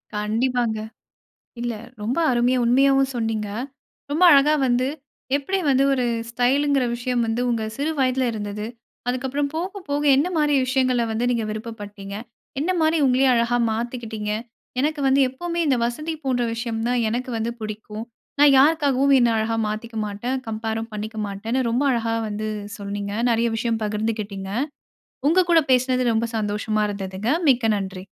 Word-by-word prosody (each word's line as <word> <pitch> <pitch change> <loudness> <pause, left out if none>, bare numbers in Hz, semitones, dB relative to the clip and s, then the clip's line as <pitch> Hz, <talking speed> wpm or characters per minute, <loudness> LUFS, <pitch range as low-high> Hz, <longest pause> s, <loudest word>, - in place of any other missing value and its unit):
கண்டிப்பாங்க. 225 +2 0 0.8
இல்ல 240 -1 -2 0.3
ரொம்ப 235 +8 -1
அருமையா 245 +1 +2
உண்மையாவும் 270 +2 +3
சொன்னிங்க. 225 -2 -1 0.6
ரொம்ப 315 +5 0
அழகா 290 +2 +6
வந்து 250 +1 +2 0.5
எப்படி 375 +8 -1
வந்து 270 0 +4
ஒரு 255 -2 +1 0.3
ஸ்டைலுங்கிற 270 +3 +2
விஷயம் 245 0 -1
வந்து, 225 +2 -1
உங்க 230 -2 0
சிறு 295 +3 -1
வயதில 255 0 +2
இருந்தது. 210 -1 -4 0.4
அதுக்கப்புறம் 265 +3 -1
போக 375 +5 -3
போக 285 +1 0
என்ன 290 +6 +2
மாரி 295 -1 +2
விஷயங்கள 255 -2 +2
வந்து 230 +2 -1
நீங்க 235 -2 0
விருப்பப்பட்டீங்க. 210 -3 -7 0.5
என்ன 330 - 0
மாரி 315 +1 +3
உங்களையே 260 +1 +3
அழகா 235 +1 +2
மாத்திக்கிட்டிங்க. 225 -2 -3 0.5
எனக்கு 300 +2 0
வந்து 270 +1 +4
எப்பவுமே 340 +6 -4
இந்த 270 -3 +3
வசதி 305 +7 -2
போன்ற 255 -2 +1
விஷயம் 230 -1 -3
தான் 245 0 +1
எனக்கு 250 +3 -3
வந்து 225 +1 -1
பிடிக்கும். 215 0 -6 0.4
நான் 290 -1 +7
யாருக்காகவும் 280 -2 +4
என்ன 240 - +4
அழகா 220 +1 0
மாத்திக்க 220 +2 -5
மாட்டேன். 235 +6 -3
கம்பேரும் 225 +1 -3
பண்ணிக்க 215 +1 -5
மாட்டேன்னு 220 +6 -2
ரொம்ப 240 +4 +1
அழகா 230 -1 0
வந்து 215 +1 -3 0.3
சொன்னீங்க. 200 0 -4 0.2
நிறைய 235 0 +2
விஷயம் 225 0 -1
பகிர்ந்துக்கிட்டிங்க. 210 -2 -3 0.8
உங்க 360 +3 +4
கூட 330 -2 +6
பேசினது 255 -1 +2
ரொம்ப 230 +1 0
சந்தோஷமா 210 0 -1
இருந்ததுங்க. 195 +2 -3 0.2
மிக்க 240 -4 +3
நன்றி. 190 -2 -5
240 Hz, 145 wpm, -23 LUFS, 220-265 Hz, 0.8 s, நான்